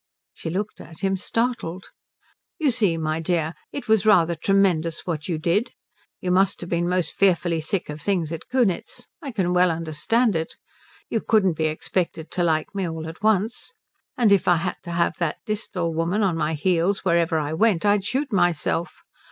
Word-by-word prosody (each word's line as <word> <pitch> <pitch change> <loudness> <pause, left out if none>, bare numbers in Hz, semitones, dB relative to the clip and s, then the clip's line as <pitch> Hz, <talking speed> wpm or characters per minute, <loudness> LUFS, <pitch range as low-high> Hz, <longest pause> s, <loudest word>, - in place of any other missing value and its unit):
She - - -6
looked 200 +5 -3
at 165 - -12
him 195 0 +1
startled. 205 -3 -2 0.7
"You 300 -5 +2
see 205 -8 +2
my 155 0 -1
dear 165 -1 0 0.2
it 285 - -6
was 220 -3 +4
rather 175 -6 +4
tremendous 170 -2 +1
what 160 -4 -3
you 165 - 0
did. 185 +9 0 0.5
You 180 - -2
must 190 +2 +3
have 175 - -7
been 175 0 +1
most 180 -1 0
fearfully 175 -4 +2
sick 180 +4 -2
of 150 0 -7
things 175 -6 0
at 165 - -7
Kunitz. 240 -8 0 0.2
I 285 - -5
can 190 -7 0
well 180 0 +4
understand 170 +8 0
it. 160 0 -3 0.6
You 225 - 0
couldn't 205 -6 +3
be 160 0 -1
expected 160 +1 -2
to 175 - 0
like 160 0 0
me 195 -3 -2
all 160 0 -5
at 165 +3 -9
once. 220 +2 0 0.4
And 230 -4 +4
if 200 -3 +4
I 175 - +6
had 170 +2 -2
to 170 - -5
have 170 0 0
that 170 -3 -1
Disthal 200 -6 -2
woman 170 +6 0
at 190 -3 +2
my 160 -1 -1
heels 180 +5 +1
wherever 170 -2 +2
I 150 0 -2
went 200 +1 +2
I'd 205 -1 +3
shoot 255 +4 -2
myself. 175 -2 0
180 Hz, 185 wpm, -23 LUFS, 165-205 Hz, 0.7 s, I